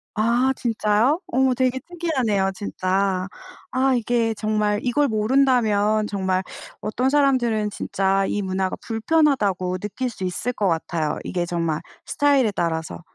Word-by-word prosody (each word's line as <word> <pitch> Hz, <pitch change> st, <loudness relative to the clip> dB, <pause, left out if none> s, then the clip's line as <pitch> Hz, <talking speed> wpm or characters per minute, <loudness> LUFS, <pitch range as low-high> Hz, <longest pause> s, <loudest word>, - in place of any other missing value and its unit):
아 235 Hz, +4 st, +2 dB
진짜요? 230 Hz, -, +1 dB
어머 260 Hz, +1 st, +2 dB
되게 255 Hz, +1 st, 0 dB
특이하네요 260 Hz, -, 0 dB
진짜. 190 Hz, -1 st, -1 dB, 0.4 s
아 260 Hz, +1 st, +2 dB
이게 230 Hz, -1 st, +1 dB
정말 215 Hz, 0 st, 0 dB
이걸 280 Hz, +4 st, +2 dB
모른다면 215 Hz, -2 st, +2 dB
정말 190 Hz, -2 st, -1 dB, 0.4 s
어떤 250 Hz, +5 st, 0 dB
사람들은 255 Hz, -7 st, +2 dB
진짜 195 Hz, -1 st, 0 dB
'이 205 Hz, -, -1 dB
문화가 190 Hz, -1 st, -1 dB
불편하다.'고 225 Hz, -, +1 dB
느낄 210 Hz, +7 st, -4 dB
수 195 Hz, -5 st, -6 dB
있을 185 Hz, +7 st, -2 dB
것 205 Hz, -5 st, -1 dB
같아요. 160 Hz, -2 st, -1 dB
이게 175 Hz, -2 st, -2 dB
정말 165 Hz, -2 st, -1 dB, 0.3 s
스타일에 275 Hz, -6 st, +2 dB
따라서. 165 Hz, -3 st, -3 dB
215 Hz, 295 characters per minute, -22 LUFS, 190-255 Hz, 0.4 s, 아